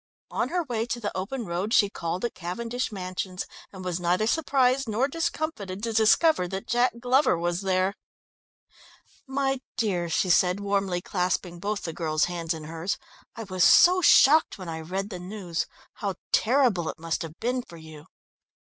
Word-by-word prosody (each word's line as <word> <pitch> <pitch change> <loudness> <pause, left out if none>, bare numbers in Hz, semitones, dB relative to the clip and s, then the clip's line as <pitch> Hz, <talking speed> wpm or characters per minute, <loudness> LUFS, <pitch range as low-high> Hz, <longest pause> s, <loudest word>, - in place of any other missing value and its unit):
On - - -1
her 355 0 0
way 235 -5 -2
to 240 - -3
the 210 -3 -4
open 215 +6 -3
road 185 +5 -1
she 205 - +5
called 180 0 -3
at 235 - -3
Cavendish 230 +9 -4
Mansions, 185 -1 -4 0.3
and 190 -2 -9
was 180 -1 -2
neither 180 +4 +1
surprised 270 -2 +2
nor 230 +5 +1
discomfited 290 - -3
to 230 -1 -2
discover 220 - +4
that 190 +2 -5
Jack 240 +2 +2
Glover 255 - +3
was 175 +2 -1
there. 190 0 +1 1.3
"My 270 -1 -1 0.2
dear," 185 -7 0
she 180 +2 +1
said, 180 +2 +3
warmly 195 -3 -1
clasping 180 -1 -2
both 205 +2 -3
the 165 - -4
girl's 155 -2 0
hands 170 -2 -4
in 160 - -8
hers, 165 +4 -3 0.4
"I 230 - -6
was 185 -3 0
so 365 +1 +7
shocked 310 -2 +6
when 185 -3 -8
I 160 0 -4
read 190 +6 -4
the 180 - -5
news! 180 -2 -4 0.3
How 200 -2 -3 0.2
terrible 230 - +3
it - - -6
must 165 0 -3
have 165 -1 -7
been 250 +2 -1
for 170 -8 -13
you." 160 -1 -12
195 Hz, 175 wpm, -26 LUFS, 175-240 Hz, 1.3 s, so